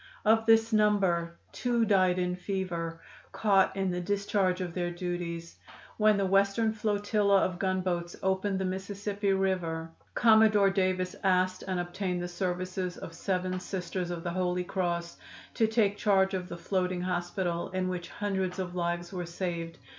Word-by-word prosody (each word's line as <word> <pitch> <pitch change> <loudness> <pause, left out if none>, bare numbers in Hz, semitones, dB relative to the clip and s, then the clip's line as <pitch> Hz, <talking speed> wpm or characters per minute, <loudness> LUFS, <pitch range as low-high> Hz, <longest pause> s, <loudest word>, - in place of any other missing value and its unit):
"Of 225 +1 +4
this 225 0 +5
number, 190 -6 +2
two 240 -2 +1
died 185 -4 +4
from 180 0 -1
fever, 180 -3 -3 0.3
caught 195 -1 +3
in 190 -1 0
the 180 0 -2
discharge 200 -1 0
of 180 -2 -4
their 175 -1 -1
duties. 175 -1 -5 0.4
When 215 -1 +4
the 200 - +1
Western 200 +3 +2
flotilla 205 -1 +2
of 180 -1 -4
gunboats 185 -3 -1
opened 190 +1 +1
the 190 - -1
Mississippi 200 +2 -2
River 175 -4 -1 0.2
Commodore 220 -3 +5
Davis 185 -1 0
asked 185 -1 +2
and 185 -1 -1
obtained 180 +1 -2
the - - -2
services 180 0 -3
of 165 - -8
seven 185 +1 -2
Sisters 180 -1 -4
of 170 -1 -4
the 175 - -2
Holy 180 0 0
Cross 175 -2 -2 0.4
to 225 - +2
take 215 -2 +2
charge 195 -2 +3
of 180 -1 -3
the 170 - -6
floating 180 +1 -1
hospital, 175 -1 -2
in 185 0 -1
which 180 -1 -4
hundreds 190 -3 -2
of 185 -2 -4
lives 175 0 -2
were 180 -2 -4
saved. 170 -1 -4
185 Hz, 155 wpm, -29 LUFS, 175-200 Hz, 0.4 s, this